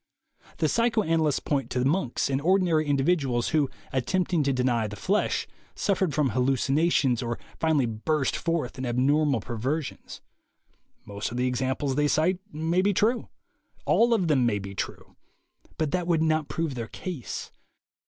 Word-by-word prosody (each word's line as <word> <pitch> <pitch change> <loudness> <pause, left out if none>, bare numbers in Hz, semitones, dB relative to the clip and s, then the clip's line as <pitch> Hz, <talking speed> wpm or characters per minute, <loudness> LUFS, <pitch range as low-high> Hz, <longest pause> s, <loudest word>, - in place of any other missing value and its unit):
The - - +2
psychoanalysts 165 - +2
point 135 -5 -1
to 125 0 0
monks 140 -3 0
and 135 0 -1
ordinary 170 -3 +2
individuals 140 -4 +1
who, 150 -4 +2 0.2
attempting 170 +6 +1
to 140 -1 +1
deny 125 -4 +1
the 105 - -7
flesh, 200 - 0 0.3
suf 200 -2 0
fered 185 -5 +1
from 145 -2 +1
hallucinations 135 0 +2
or 120 -1 -3 0.2
finally 155 -5 +2
burst 130 +6 -1
forth 165 -7 -2
in 130 - -3
abnormal 135 +1 +2
perversions. 130 +7 -4 0.8
Most 100 +1 -4
of 120 - -6
the 125 - +1
examples 130 +2 -1
they 145 +2 +2
cite 170 +5 +2
may 165 +3 0
be 200 0 +1
true. 230 +6 +1 0.6
All 235 +1 +4
of 185 -6 0
them 140 -5 +3
may 115 -4 +2
be 100 -1 -6
true. 100 - -6 0.6
But 155 -3 -1
that 180 +1 -1
would 165 -2 +2
not 155 -2 +1
prove 160 -3 -2
their 115 -3 -5
case. 165 -5 -6
145 Hz, 155 wpm, -26 LUFS, 125-165 Hz, 0.8 s, All